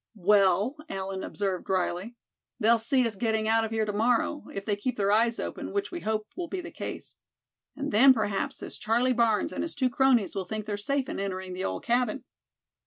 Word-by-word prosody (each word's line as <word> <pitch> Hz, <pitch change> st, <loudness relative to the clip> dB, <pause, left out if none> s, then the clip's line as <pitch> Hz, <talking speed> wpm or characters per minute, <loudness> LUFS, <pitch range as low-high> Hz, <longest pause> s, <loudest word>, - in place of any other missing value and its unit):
"Well," 200 Hz, -, +3 dB
Allan 190 Hz, 0 st, -4 dB
observed, 195 Hz, -3 st, -3 dB
drily, 185 Hz, +4 st, -1 dB, 0.4 s
"they'll 230 Hz, +2 st, +4 dB
see 250 Hz, +3 st, +2 dB
us 230 Hz, -, -1 dB
getting 220 Hz, +1 st, 0 dB
out 225 Hz, 0 st, +3 dB
of 225 Hz, -, -2 dB
here 220 Hz, -1 st, 0 dB
to 210 Hz, -, -3 dB
morrow, 240 Hz, +7 st, +1 dB
if 195 Hz, 0 st, -6 dB
they 210 Hz, -, +1 dB
keep 245 Hz, +4 st, -3 dB
their 200 Hz, -1 st, +2 dB
eyes 230 Hz, +2 st, +3 dB
open, -, -, -5 dB
which 405 Hz, 0 st, -1 dB
we 350 Hz, -, -4 dB
hope 215 Hz, -5 st, -1 dB
will 355 Hz, -1 st, -4 dB
be 380 Hz, -, -4 dB
the 340 Hz, -, -7 dB
case. -, -, -7 dB, 0.6 s
And 285 Hz, +1 st, -3 dB
then 260 Hz, +6 st, +7 dB
perhaps 210 Hz, -5 st, 0 dB
this -, -, -6 dB
Charlie 240 Hz, +4 st, +2 dB
Barnes 230 Hz, -3 st, +2 dB
and -, -, -3 dB
his 330 Hz, -, -4 dB
two 260 Hz, -3 st, +1 dB
cronies 255 Hz, -5 st, +3 dB
will 195 Hz, -2 st, -3 dB
think 215 Hz, +2 st, -4 dB
they're 210 Hz, -1 st, -2 dB
safe 265 Hz, +6 st, -1 dB
in -, -, -4 dB
entering 190 Hz, -1 st, -4 dB
the 185 Hz, +1 st, -3 dB
old -, -, -3 dB
cabin." 245 Hz, +1 st, 0 dB
220 Hz, 210 wpm, -28 LUFS, 200-250 Hz, 0.6 s, then